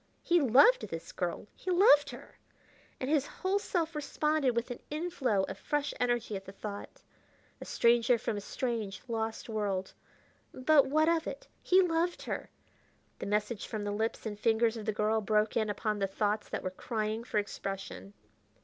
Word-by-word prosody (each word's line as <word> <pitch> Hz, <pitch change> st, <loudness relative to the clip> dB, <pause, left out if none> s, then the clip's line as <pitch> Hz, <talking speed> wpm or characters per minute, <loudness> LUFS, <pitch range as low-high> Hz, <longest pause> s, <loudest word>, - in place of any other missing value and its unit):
He 345 Hz, -1 st, +4 dB
loved 285 Hz, -, +6 dB
this -, -, -7 dB
girl! -, -, -3 dB
he -, -, -6 dB
loved 345 Hz, -6 st, +6 dB
her! -, -, -11 dB, 0.6 s
and 255 Hz, -, -3 dB
his 290 Hz, -1 st, +2 dB
whole 385 Hz, +2 st, -1 dB
self 335 Hz, -4 st, -1 dB
responded 300 Hz, -3 st, 0 dB
with 235 Hz, +2 st, -1 dB
an 245 Hz, -, -5 dB
inflow 295 Hz, -, 0 dB
of -, -, -5 dB
fresh 295 Hz, -1 st, -1 dB
energy 240 Hz, -3 st, 0 dB
at 195 Hz, 0 st, -6 dB
the 195 Hz, -, -8 dB
thought. 205 Hz, +1 st, -8 dB, 0.6 s
A -, -, -6 dB
stranger 235 Hz, +1 st, +3 dB
from 220 Hz, -, -2 dB
a 205 Hz, -, -4 dB
strange, 220 Hz, -3 st, -3 dB
lost 225 Hz, -1 st, -3 dB
world! 200 Hz, -4 st, -2 dB, 0.6 s
but 280 Hz, +2 st, +4 dB
what 310 Hz, +3 st, +3 dB
of 335 Hz, -1 st, +2 dB
it? -, -, -6 dB
he 375 Hz, +1 st, +5 dB
loved 340 Hz, 0 st, 0 dB
her!... -, -, -4 dB, 0.7 s
The -, -, -4 dB
message 210 Hz, +1 st, -1 dB
from 215 Hz, -2 st, -4 dB
the 205 Hz, -, -2 dB
lips 220 Hz, +3 st, -2 dB
and 210 Hz, -2 st, -4 dB
fingers 225 Hz, +1 st, +2 dB
of 220 Hz, -1 st, -7 dB
the -, -, +3 dB
girl 215 Hz, +1 st, +1 dB
broke 210 Hz, +1 st, +1 dB
in 215 Hz, -2 st, +1 dB
upon 210 Hz, 0 st, -1 dB
the 195 Hz, -, +1 dB
thoughts 210 Hz, +2 st, -1 dB
that -, -, -4 dB
were 185 Hz, -, -2 dB
crying 215 Hz, +3 st, -3 dB
for 230 Hz, -, -3 dB
expression. 195 Hz, -, -4 dB
230 Hz, 175 wpm, -31 LUFS, 210-295 Hz, 0.7 s, loved